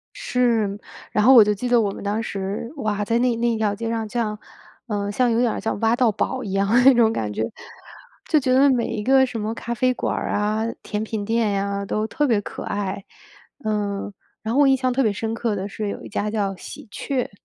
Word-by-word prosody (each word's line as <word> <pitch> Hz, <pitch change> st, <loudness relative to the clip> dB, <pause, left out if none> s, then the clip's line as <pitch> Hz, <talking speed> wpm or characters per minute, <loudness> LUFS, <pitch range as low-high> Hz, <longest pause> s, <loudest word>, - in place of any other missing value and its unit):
是。 235 Hz, -, 0 dB, 0.3 s
然 210 Hz, -, +2 dB
后 260 Hz, +4 st, +7 dB
我 230 Hz, -4 st, +10 dB
就 210 Hz, 0 st, +1 dB
记 245 Hz, +5 st, -4 dB
得 240 Hz, -1 st, +5 dB
我 205 Hz, -3 st, +1 dB
们 -, -, -8 dB
当 210 Hz, +2 st, -1 dB
时， 200 Hz, +3 st, -4 dB
哇， 210 Hz, -5 st, -1 dB
在 230 Hz, +3 st, +1 dB
那 245 Hz, -1 st, +2 dB
那 235 Hz, +1 st, +1 dB
一 230 Hz, -, 0 dB
条 215 Hz, -2 st, +1 dB
街 230 Hz, +2 st, -4 dB
上 225 Hz, -1 st, -2 dB
像， 215 Hz, -3 st, -2 dB, 0.5 s
呃， 205 Hz, -2 st, -2 dB
像 245 Hz, +3 st, +2 dB
有 230 Hz, -, +2 dB
点 240 Hz, -2 st, +1 dB
像 220 Hz, -, -2 dB
挖 225 Hz, +2 st, +3 dB
到 245 Hz, -2 st, +3 dB
宝 -, -, -2 dB
一 200 Hz, -, -5 dB
样 195 Hz, +1 st, +1 dB
的 240 Hz, +3 st, +5 dB
那 270 Hz, -, +9 dB
种 230 Hz, -2 st, +4 dB
感 105 Hz, -, -2 dB
觉， 110 Hz, -, -2 dB, 0.8 s
就 310 Hz, -, +4 dB
觉 255 Hz, -2 st, +1 dB
得 275 Hz, +2 st, +6 dB
每 245 Hz, -3 st, +1 dB
一 210 Hz, -, -3 dB
个 265 Hz, +1 st, +5 dB
什 245 Hz, -3 st, -5 dB
么 215 Hz, +1 st, -2 dB
咖 235 Hz, -, -4 dB
啡 255 Hz, +1 st, +2 dB
馆 -, -, -2 dB
儿 -, -, -3 dB
啊、 215 Hz, +2 st, 0 dB, 0.2 s
甜 210 Hz, +1 st, -3 dB
品 220 Hz, -1 st, -3 dB
店 225 Hz, -1 st, +1 dB
呀， 200 Hz, 0 st, -1 dB
都 215 Hz, +2 st, -1 dB
特 295 Hz, +5 st, 0 dB
别 225 Hz, -5 st, +2 dB
可 -, -, -7 dB
爱， 200 Hz, -1 st, -3 dB, 0.6 s
嗯， 205 Hz, -1 st, -2 dB, 0.3 s
然 220 Hz, +1 st, -3 dB
后 280 Hz, -, +4 dB
我 285 Hz, -, +6 dB
印 270 Hz, -, +5 dB
象 255 Hz, -1 st, 0 dB
特 260 Hz, +2 st, +1 dB
别 220 Hz, -, +2 dB
深 225 Hz, +3 st, -3 dB
刻 230 Hz, -2 st, -1 dB
的 195 Hz, 0 st, -3 dB
是 210 Hz, +1 st, -4 dB
有 -, -, -6 dB
一 -, -, -9 dB
家 210 Hz, 0 st, -2 dB
叫” 205 Hz, -3 st, -1 dB
喜 215 Hz, -, -10 dB
鹊“。 260 Hz, -3 st, -2 dB
220 Hz, 260 characters per minute, -22 LUFS, 205-245 Hz, 0.8 s, 我